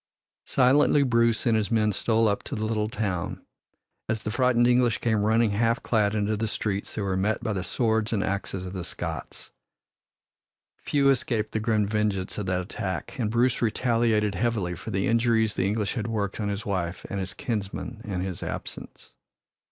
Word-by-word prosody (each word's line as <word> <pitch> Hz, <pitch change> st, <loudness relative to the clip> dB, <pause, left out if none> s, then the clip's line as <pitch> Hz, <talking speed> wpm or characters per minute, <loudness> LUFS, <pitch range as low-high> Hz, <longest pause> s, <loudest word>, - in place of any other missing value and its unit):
Silently 140 Hz, +2 st, +4 dB
Bruce 115 Hz, -3 st, +2 dB
and 115 Hz, -2 st, +3 dB
his 105 Hz, -3 st, +1 dB
men 110 Hz, -2 st, +2 dB
stole 115 Hz, +2 st, +2 dB
up 100 Hz, -1 st, 0 dB
to -, -, -6 dB
the 110 Hz, -, -2 dB
little 110 Hz, -1 st, 0 dB
town. 100 Hz, -4 st, -3 dB, 0.6 s
As 110 Hz, -1 st, -1 dB
the 105 Hz, -, -2 dB
frightened 125 Hz, 0 st, +3 dB
English 120 Hz, -2 st, +3 dB
came 110 Hz, -3 st, +1 dB
running 110 Hz, +1 st, +3 dB
half 115 Hz, +3 st, +1 dB
clad 105 Hz, -2 st, +2 dB
into 105 Hz, 0 st, +1 dB
the 110 Hz, +2 st, -1 dB
streets 100 Hz, -2 st, -3 dB
they 105 Hz, -, -2 dB
were 95 Hz, -1 st, 0 dB
met 100 Hz, +4 st, 0 dB
by 110 Hz, -, -1 dB
the 95 Hz, -2 st, -2 dB
swords 110 Hz, +3 st, 0 dB
and 105 Hz, -4 st, +1 dB
axes 95 Hz, -1 st, -3 dB
of 90 Hz, -, -6 dB
the 95 Hz, -2 st, -4 dB
Scots. 80 Hz, -, -6 dB, 1.3 s
Few 140 Hz, -1 st, +1 dB
escaped 115 Hz, -5 st, 0 dB
the 110 Hz, -, -1 dB
grim 110 Hz, -1 st, +1 dB
vengeance 105 Hz, -2 st, -1 dB
of 100 Hz, -, -3 dB
that 90 Hz, 0 st, +1 dB
attack, 95 Hz, -, -5 dB
and 110 Hz, -4 st, 0 dB
Bruce 120 Hz, +2 st, +2 dB
retaliated 115 Hz, -2 st, +2 dB
heavily 100 Hz, -3 st, 0 dB
for 90 Hz, +6 st, -8 dB
the 95 Hz, -2 st, 0 dB
injuries 115 Hz, -2 st, +2 dB
the 95 Hz, -, 0 dB
English 105 Hz, -1 st, 0 dB
had 110 Hz, -3 st, -3 dB
worked 105 Hz, -4 st, -2 dB
on 105 Hz, -1 st, -1 dB
his 100 Hz, +2 st, -4 dB
wife 90 Hz, -3 st, -2 dB
and 100 Hz, -, -3 dB
his 95 Hz, -1 st, -4 dB
kinsmen 110 Hz, +1 st, -4 dB
in 95 Hz, -4 st, -3 dB
his 95 Hz, -2 st, -4 dB
absence. -, -, -7 dB
110 Hz, 185 wpm, -26 LUFS, 100-115 Hz, 1.3 s, Silently